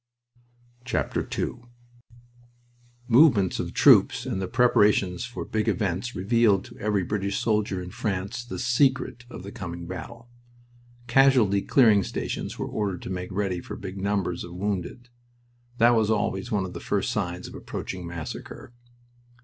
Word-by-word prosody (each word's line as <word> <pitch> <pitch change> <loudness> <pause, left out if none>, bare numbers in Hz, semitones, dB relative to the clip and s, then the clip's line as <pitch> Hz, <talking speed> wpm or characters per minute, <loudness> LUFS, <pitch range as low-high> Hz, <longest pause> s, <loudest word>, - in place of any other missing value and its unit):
II 115 - +2
The - - -2 1.5
movements 115 - +5
of - - -3
troops - - +5
and 95 - -2
the 95 - -2
preparations 105 -5 +3
for 120 +2 -6
big 110 -1 -2
events 100 +4 -1
revealed 100 0 +2
to - - -13
every 105 -2 0
British 100 +1 -2
soldier 105 -4 0
in 90 - -8
France 100 +5 -3
the 120 - -7
"secret" 125 -1 +1
of 90 - -9
the 100 - -8
coming 85 -6 -7
battle. 115 +7 -8 0.8
Casualty 120 -6 +4
clearing 110 -6 +5
stations - - -4
were - - -3
ordered 100 -4 -3
to - - -6
make 90 0 -4
ready 95 -2 -1
for - - -8
big 95 +1 -7
numbers 100 -3 -1
of 85 0 -9
wounded. 100 +5 -4 0.7
That 120 +1 +6
was 110 -3 +2
always 105 +1 -1
one 100 -3 +1
of 90 - -7
the - - -6
first - - -1
signs 90 +1 -3
of - - -11
approaching 90 -2 -6
massacre. 85 +7 -8
100 Hz, 150 wpm, -26 LUFS, 95-120 Hz, 1.5 s, That